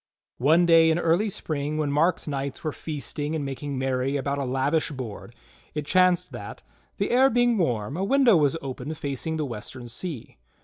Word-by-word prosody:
One 160 +7 +4
day 165 -1 +6
in 160 - +2
early 175 +5 +2
spring 150 -5 -3
when 150 -2 0
Mark's 165 +5 +1
knights 140 -2 -4
were 155 - -1
feasting 150 0 -4
and 150 -3 -2
making 140 +1 -4
merry 130 +1 0
about 140 +1 -2
a 140 - -1
lavish 135 +5 0
board, 120 -4 -7 0.4
it 150 -1 -2
chanced 180 +1 +3
that, - - -8 0.3
the - - -1
air 260 +2 +5
being 245 -1 +3
warm, 120 - -1
a 185 - -2
window 255 0 +5
was 150 0 +3
open 135 +3 -5
facing 145 +3 -3
the 155 - -1
western 120 +1 -7
sea. 130 +1 -6
150 Hz, 180 wpm, -25 LUFS, 135-170 Hz, 0.4 s, day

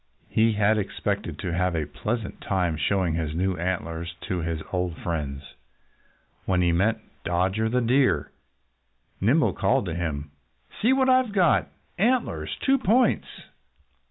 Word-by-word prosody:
He 110 0 +3
had 105 +1 +3
expected 100 - -3
to 85 - -3
have 90 0 0
a 80 -2 -1
pleasant 105 +8 -4
time 90 -4 0
showing 90 +3 +1
his 80 -2 -2
new 95 +2 0
antlers 85 -1 -3
to 90 - -3
his 80 -1 -3
old 90 -2 -1
friends. 75 -4 -4 0.9
When 90 -1 +2
he 85 - +3
met 105 +6 +2 0.2
Dodger 95 +5 0
the 125 +2 +1
Deer, 120 - +2 0.9
Nimble - - +3
called - - +1
to 85 - -3
him: 75 -4 -3 0.5
"See 235 - +4
what 265 0 +3
I've 255 -4 +3
got! 180 -5 +3 0.3
Antlers! 245 +5 0
Two 270 0 +3
points!" 245 +2 +3
90 Hz, 140 wpm, -25 LUFS, 85-115 Hz, 0.9 s, See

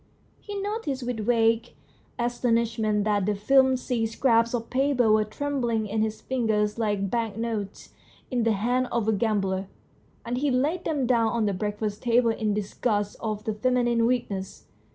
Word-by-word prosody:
He 410 -1 -6
noticed 395 - -3
with 245 -2 -3
a - - -2
vague 230 +1 +2 0.4
astonishment 230 -3 0
that 205 -2 +1
the 210 - +1
flimsy 255 +1 +2
scraps 230 0 +2
of 230 -1 -5
paper 260 -4 +2
were 215 0 +4
trembling 235 -1 -2
in 215 +1 -1
his 220 0 -2
fingers 220 -4 0
like 205 -3 0
banknotes 225 -3 -3 0.4
in 250 -2 +1
the 225 -1 +2
hands 245 +5 0
of 230 -2 0
a 220 - +3
gambler, 195 -3 0 0.6
and 245 +2 -2
he 290 +1 +1
laid 295 +8 0
them 290 -5 0
down 235 -2 +3
on 225 -1 0
the 200 - 0
breakfast 210 +2 -3
table 235 -1 +3
in 215 -2 -1
disgust 205 0 -1
of 215 -2 -3
the 220 -1 -2
feminine 240 +1 +2
weakness. 205 -6 -2
230 Hz, 160 wpm, -26 LUFS, 210-250 Hz, 0.6 s, were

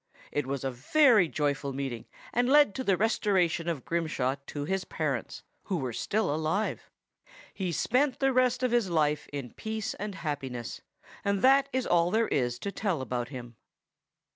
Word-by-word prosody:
This 145 -2 0
was 135 0 -3
a 135 - -1
very 215 - +4
joyful 145 -2 -1
meeting, 130 -4 -4 0.3
and 245 +1 +2
led 290 -6 +6
to 260 - -3
the 195 -6 +2
restoration 190 -6 +1
of 155 -6 -3
Grimshaw 155 -6 -1
to 145 -1 -4
his 190 +3 -1
parents, - - -3 0.2
who 190 - -1
were 130 -6 -3
still 200 - 0
alive. 160 +7 -1 0.6
He 185 -3 -2
spent 255 - +1
the 270 -1 +2
remainder 255 0 +2
of 250 - 0
his 235 -5 +2
life 150 -3 +1
in 140 -5 -5
peace 220 -1 -4
and 205 -1 -5
happiness; 140 -7 -4 0.4
and 200 -1 0
that 275 +1 +5
is 260 0 0
all 170 0 +3
there 225 +3 +1
is 120 -2 0
to 200 - -3
tell 195 -6 -1
about 125 -2 -3
him. 120 -4 -9
170 Hz, 170 wpm, -29 LUFS, 140-220 Hz, 0.6 s, led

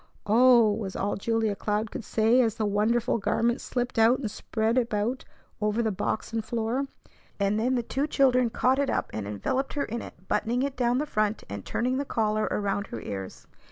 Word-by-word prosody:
"Oh 235 0 +6
h!" 210 - -4
was 195 -3 -5
all 205 - -1
Julia 220 0 0
Cloud 210 +1 -2
could - - -5
say 225 +4 +3
as 225 -3 +1
the 220 - -1
wonderful 225 +4 +1
garment 235 +4 +1
slipped 245 -2 -2
out 230 +3 +5
and 225 -6 -4
spread 220 +2 -1
about 235 +1 -1 0.4
over 210 +2 +1
the 220 - +1
box 210 +3 -3
and 225 -1 -1
floor. 235 +5 -1 0.5
And 200 +1 +1
then 250 +3 +1
the 240 - 0
two 275 +5 -1
children 255 -4 +3
caught 255 +3 +2
it 280 -1 +1
up, - - -1
and 105 -2 -4
enveloped 260 - -2
her 290 - -1
in 230 +2 -4
it, 185 +2 -12
buttoning 245 +3 0
it 280 -1 -2
down 245 0 +1
the 295 - 0
front 215 -6 -1
and 100 -1 -5
turning 255 +2 -1
the 280 - 0
collar 215 -3 0
around 200 0 -1
her 115 - -6
ears. 95 -3 -7
225 Hz, 205 wpm, -27 LUFS, 210-250 Hz, 0.5 s, Oh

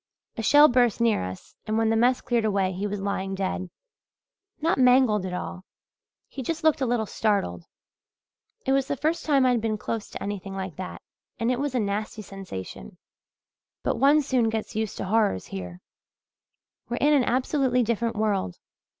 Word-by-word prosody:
A - - -3
shell 290 +6 +7
burst 245 -4 +2
near 230 - +2
us 95 0 -8
and 215 +1 0
when 225 0 +2
the - - +2
mess 245 +3 +3
cleared 240 -2 0
away 195 -3 +1
he 190 +3 -3
was 205 0 -4
lying 195 -1 -2
dead 185 -1 -3 0.9
not 325 -2 +1
mangled 250 -6 +4
at 180 - -5
all 180 0 -6 0.6
he 270 - -7
just 315 +6 -3
looked 315 -3 +3
a 260 - +1
little 235 -2 +1
startled. 195 - -1 1.0
It 265 - +1
was 270 0 +2
the 280 - -2
first 315 +5 0
time 275 -3 +4
I'd 245 -3 +3
been 215 -1 -1
close 220 +1 -4
to - - -7
anything 195 -1 -5
like 190 -4 -5
that 185 - -7 0.3
and 230 +1 0
it 250 - -1
was 285 -2 -2
a - - +2
nasty 210 +1 -3
sensation, 95 - -8 0.9
but - - 0
one 290 +3 +5
soon 255 -4 +1
gets 220 -1 -4
used 220 -1 -2
to - - -3
horrors 205 - +1
here. 90 -2 -7 1.1
We're 240 - -2
in 295 +1 +3
an 280 -3 +4
absolutely 255 0 +1
different 230 0 -1
world. 205 - -1
225 Hz, 180 wpm, -26 LUFS, 195-255 Hz, 1.1 s, shell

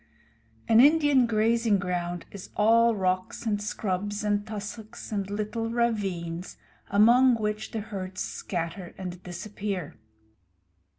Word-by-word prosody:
An 225 0 +6
Indian 290 -2 +5
grazing 225 -1 +2
ground 175 -2 -3
is 200 -2 -9
all 230 +2 +4
rocks 185 +3 -1
and 205 -2 0
scrub 205 -1 -2
and 205 0 0
tussocks 215 +1 -7
and 200 -2 -2
little 215 +2 -2
ravines, 195 -7 -2 0.3
among 240 +5 +6
which 215 -1 -2
the 220 - -4
herds 190 -3 -6
scatter 175 0 -4
and 180 -1 -6
disappear. 190 - -5
205 Hz, 115 wpm, -27 LUFS, 185-225 Hz, 0.3 s, An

